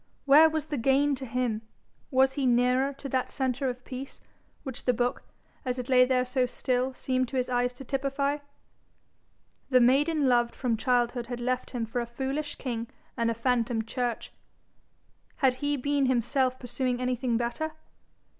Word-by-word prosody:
Where 300 +3 +8
was 315 -1 -2
the 295 -4 -3
gain 275 +4 +3
to 265 -1 -5
him? 235 -2 -1 0.5
Was 265 -1 +3
he 275 -2 0
nearer 250 +3 +3
to 275 0 -8
that 255 0 0
centre 265 0 -1
of 250 0 -7
peace, 265 +1 -7 0.4
which 265 -4 -7
the 250 - +3
book, 245 +1 0 0.4
as 255 -2 -2
it 250 0 -5
lay 255 -1 +6
there 255 0 +1
so 250 0 +1
still, 250 +1 0
seemed 255 0 0
to 265 - -4
his 255 0 -1
eyes 245 0 +1
to 250 - -10
typify? 275 +2 -1 1.3
The 255 -2 +5
maiden 280 +4 +3
loved 240 -1 +2
from 245 -3 0
childhood 240 +1 0
had 245 0 -5
left 250 +1 -1
him 240 -3 -3
for 235 +2 -2
a 235 - -4
foolish 270 +5 -3
king 235 -3 -4 0.3
and 230 -2 +1
a 230 - -1
phantom 230 -1 0
church: 240 -1 -3 1.0
had 265 -3 +3
he 290 0 0
been 280 +1 +1
himself 255 +1 +1
pursuing 245 0 -2
anything 250 -1 0
better? 240 +7 -2
255 Hz, 170 wpm, -28 LUFS, 245-270 Hz, 1.3 s, Where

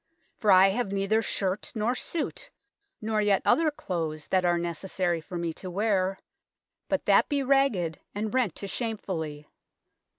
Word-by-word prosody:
for 215 -5 -1
I 190 +1 +7
have 200 0 -1
neither 200 +3 +1
shirt 195 -2 -2
nor 220 +3 +1
sute, 335 - -4 0.5
nor 215 0 0
yett 205 -2 +2
other 325 -1 +4
clothes, 165 - -4
that 185 -1 +2
ar 175 -1 +3
necessary 175 0 -2
for 175 +2 -7
me 170 -1 -2
to 185 - -8
wear, 195 -1 +1 0.7
but - - 0
that - - +4
bee 285 -2 +1
ragged 255 -12 +2 0.2
and 215 +2 -3
rent 250 -9 +1
to 200 - -6
shamefully. 175 -10 -4
195 Hz, 155 wpm, -27 LUFS, 175-225 Hz, 0.7 s, I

